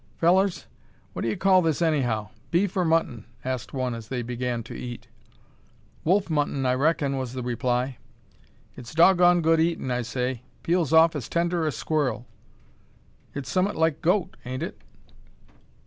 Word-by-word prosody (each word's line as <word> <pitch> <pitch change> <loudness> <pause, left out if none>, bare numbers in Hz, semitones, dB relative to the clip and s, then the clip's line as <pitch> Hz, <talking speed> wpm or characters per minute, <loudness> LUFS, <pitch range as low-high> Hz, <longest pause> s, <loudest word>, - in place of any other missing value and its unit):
"Fellers! 185 +1 +2 0.5
what - - -5
d'ye 115 -2 -1
call 190 -1 +4
this 160 -4 0
anyhow? 125 - 0 0.2
Beef 180 +2 +1
or 185 - +2
mutton?" 160 -9 0 0.2
asked 130 -2 -3
one, 130 -2 -2
as 115 -1 -7
they 125 -1 -3
began 120 0 -3
to 120 - -9
eat. 120 -1 -7 1.0
"Wolf 190 +4 +2
mutton, 145 -4 0
I 125 - +3
reckin," 140 0 +1
was 130 -2 -4
the 130 -1 -4
reply. 125 +1 -1 0.8
"It's 125 +3 -10
dog 175 +2 +6
gone 175 -1 +5
good 165 0 +4
eatin', 165 -5 0
I 125 0 0
say; 125 +1 -3 0.2
peels 170 -4 +1
off 160 0 +6
as 140 -6 -5
tender 170 -1 0
as 145 - -2
squ'll." 145 -6 -1 1.1
"It's 140 -2 -5
some'ut 190 +2 +1
like 160 -2 +1
goat, 180 +2 +1
ain't 130 +1 -4
it?" - - -7
145 Hz, 160 wpm, -25 LUFS, 125-170 Hz, 1.1 s, dog